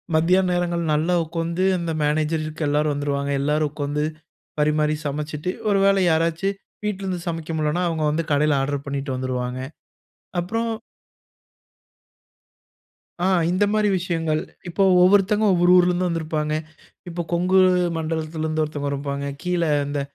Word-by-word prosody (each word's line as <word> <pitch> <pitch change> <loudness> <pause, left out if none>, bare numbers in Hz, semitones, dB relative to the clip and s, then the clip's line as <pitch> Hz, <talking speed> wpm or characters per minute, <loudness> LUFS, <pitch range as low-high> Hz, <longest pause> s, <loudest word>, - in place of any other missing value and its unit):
மதியான 180 +4 +3
நேரங்கள் 175 -1 0
நல்லா 160 +4 +1
உட்காந்து 165 +2 -2
அந்த 170 -1 -3
மேனேஜருக்கு 155 +1 -1
எல்லாரும் 150 +1 +1
வந்துருவாங்க. 140 0 -2
எல்லாரும் 150 +1 +1
உட்கார்ந்து 150 0 -2 0.6
பரிமாறி 150 0 +2
சமைச்சிட்டு 150 +3 -3 0.2
ஒருவேள 195 0 +4
யாராச்சு 165 +4 +1 0.4
வீட்டிலருந்து 190 -3 -2
சமைக்க 165 -1 -4
முடியலனா 155 +3 0
அவங்க 160 -2 -1
வந்து 160 +2 -1
கடைல 150 +1 +3
ஆர்டர் 140 +1 -2
பண்ணிட்டு 140 -1 -3
வந்துருவாங்க. 130 -1 -3 0.8
அப்புறம் 225 +6 -2 2.5
ஆ - - +2 0.2
இந்த 185 +3 +2
மாரி 215 -1 +2
விஷயங்கள். 165 -3 -1 0.3
இப்போ 195 +3 +1 0.2
ஒவ்வொருத்தங்க 205 +3 +4
ஒவ்வொரு 175 0 +3
ஊரிலிருந்தும் 180 0 +3
வந்திருப்பாங்க. 155 -2 -2 0.5
இப்போ 175 0 -3
கொங்கு 180 +2 +3 0.4
மண்டலத்திலிருந்து 160 0 -2
ஒருத்தவங்க 145 -2 -3
இருப்பாங்க. 140 0 -3 0.2
கீழ 180 -1 0 0.2
இந்த 145 0 -2
160 Hz, 120 wpm, -23 LUFS, 150-175 Hz, 2.5 s, ஒருவேள